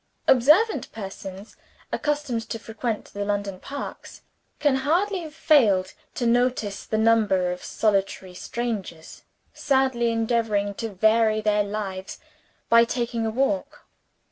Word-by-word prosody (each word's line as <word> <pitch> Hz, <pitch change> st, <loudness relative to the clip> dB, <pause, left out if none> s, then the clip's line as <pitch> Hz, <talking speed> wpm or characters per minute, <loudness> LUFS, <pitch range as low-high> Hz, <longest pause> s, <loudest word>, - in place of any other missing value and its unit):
Observant 300 Hz, -, +4 dB
persons, 195 Hz, -1 st, -8 dB, 0.4 s
accustomed 290 Hz, -7 st, -2 dB
to -, -, -3 dB
frequent 225 Hz, 0 st, -4 dB
the 205 Hz, -, -3 dB
London 200 Hz, -2 st, -2 dB
parks, 280 Hz, +6 st, -8 dB, 0.3 s
can 285 Hz, -3 st, +2 dB
hardly 360 Hz, +9 st, +1 dB
have 310 Hz, -2 st, -9 dB
failed 215 Hz, -, +3 dB, 0.2 s
to 245 Hz, -, -2 dB
notice 235 Hz, -4 st, 0 dB
the 220 Hz, -, -1 dB
number 215 Hz, -5 st, +3 dB
of 180 Hz, -, -6 dB
solitary 195 Hz, -3 st, -1 dB
strangers 200 Hz, -6 st, -5 dB, 0.3 s
sadly 265 Hz, -4 st, +1 dB
endeavoring 225 Hz, -3 st, 0 dB
to 225 Hz, +3 st, -4 dB
vary 220 Hz, +2 st, +3 dB
their 210 Hz, -1 st, +2 dB
lives 200 Hz, -2 st, -5 dB, 0.5 s
by 230 Hz, 0 st, +6 dB
taking 235 Hz, -1 st, -2 dB
a -, -, 0 dB
walk. 265 Hz, +4 st, -1 dB
225 Hz, 120 wpm, -24 LUFS, 200-255 Hz, 0.5 s, by